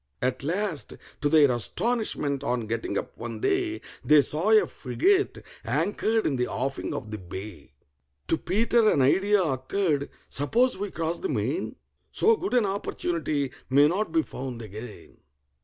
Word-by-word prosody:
At 125 0 -1
last, 165 - -1 0.3
to 145 - +2
their 145 -3 +6
astonishment, 145 - -1
on 120 -3 -1
getting 115 +1 -2
up - - -5
one - - -5
day, 380 -3 0 0.2
They 150 -1 +6
saw 160 +10 0
a 220 -1 +6
frigate 380 - 0 0.2
anchored 220 +2 0
in 140 - +1
the 125 - 0
offing 135 +1 -3
of 110 -4 -6
the 110 - -5
bay. 90 -5 -9 0.5
To - - +3
PETER 220 +6 +2
an 140 - +3
idea 195 +8 +3
occurred. 145 +1 -1 0.2
"Suppose 235 - +2
we 205 +2 -4
cross 165 -1 -2
the 380 - -3
main? - - -2 0.4
So 455 - +4
good 390 -8 -2
an 240 -4 +4
opportunity 165 -7 -2 0.2
may 140 +3 +6
not 185 +3 -1
be 160 -1 +2
found 125 -5 -6
again." 110 +2 -10
155 Hz, 155 wpm, -26 LUFS, 130-210 Hz, 0.5 s, their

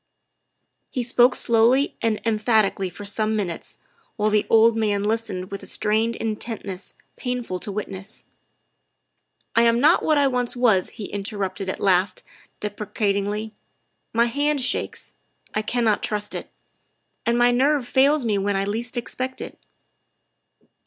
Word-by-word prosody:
He 250 - -2
spoke 245 +1 +4
slowly 235 +4 +3
and 225 -2 +1
emphatically 215 -3 +2
for 205 +3 -9
some 215 +2 0
minutes, 185 -6 -4 0.4
while 215 -1 +1
the 210 -1 +2
old 225 0 +6
man 210 -2 0
listened 210 -4 -2
with 200 - -5
a - - -10
strained 220 +2 +1
intentness 215 -4 -5 0.2
painful 245 -7 -3
to 205 - -5
witness. 195 0 -7 0.6
" - - -43
I 230 - +6
am 235 0 +4
not 305 +7 +5
what 310 -1 +2
I 285 - +4
once 250 -2 0
was," 220 -7 +3
he 215 - -5
interrupted 195 -2 -3
at - - -4
last 185 -1 +2 0.4
deprecatingly; 210 0 -2 0.3
" - - -49
my 230 +1 +3
hand 285 +4 0
shakes; 255 - -2 0.4
I 215 - 0
cannot 220 -1 +1
trust 210 -1 -2
it. - - -5 0.8
And 235 0 +3
my 240 0 +5
nerve 265 +1 +2
fails 275 +1 +3
me 210 -3 +1
when 200 +1 0
I 195 0 0
least 235 +5 -3
expect 255 +2 -4
it." - - -8
220 Hz, 145 wpm, -23 LUFS, 205-240 Hz, 0.8 s, old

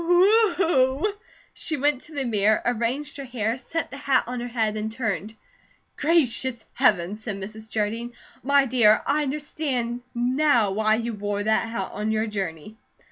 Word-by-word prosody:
Wheuuuuuu!" 350 - +3 0.4
She 315 - -2
went 285 -1 +1
to 310 - -14
the 275 -2 -1
mirror, 215 -2 +2
arranged 245 +6 -1
her 280 - -5
hair, 240 -2 -2
set 325 +6 -4
the 275 - -7
hat 275 -2 +2
on 250 +1 -4
her 240 - -4
head, 225 -3 -1
and 215 +1 -3
turned. 220 -2 -3 0.6
"Gracious 260 -6 +1
Heaven!" 205 -6 +2
said 220 -1 -5
Mrs. 215 +3 -8
Jardine. 225 +3 -2 0.3
"My 280 0 +4
dear, 230 -4 +4
I 295 +2 +2
understand 270 -4 -2
NOW 245 -3 +2
why 215 +2 +2
you 230 +1 -3
wore 205 0 -2
that 220 +1 +1
hat 230 - -4
on 210 +1 -2
your 220 0 +1
journey." 195 -2 -5
240 Hz, 160 wpm, -24 LUFS, 215-280 Hz, 0.6 s, My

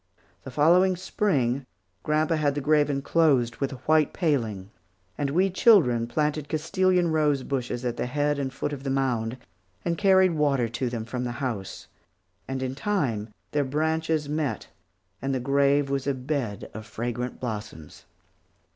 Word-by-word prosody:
The - - -9
following 175 +8 +4
Spring 140 - 0 0.3
grandpa 155 +2 +1
had 150 -3 +1
the - - -1
grave 150 +1 +3
enclosed 135 -4 +2
with 135 - -2
a - - -6
white 155 -2 +3
paling; 115 - -1 0.4
and 145 -1 -1
we 185 +6 +2
children 155 - +4
planted 150 +2 -1
Castilian 175 +2 +1
rose 150 -4 +2
bushes 125 -2 -3
at 120 -1 -2
the - - -2
head 145 +2 0
and 135 -2 -2
foot 140 +2 -3
of 140 - -6
the 135 - -2
mound, 130 -3 0 0.5
and 170 -1 -1
carried 190 -2 +5
water 140 -6 +1
to 120 +2 -2
them 115 -2 -4
from 125 +2 -4
the 120 -1 -3
house, 120 -6 -4 0.6
and 130 0 -3
in 130 0 -2
time 135 - -1 0.2
their 145 -1 +1
branches 160 +2 0
met 150 -1 -2 0.5
and 135 +1 -1
the - - 0
grave 140 +2 +2
was 140 0 -1
a 140 - +1
bed 130 -5 -3
of 110 0 -8
fragrant 120 +3 -4
blossoms. 105 -10 -7
140 Hz, 160 wpm, -26 LUFS, 125-155 Hz, 0.6 s, carried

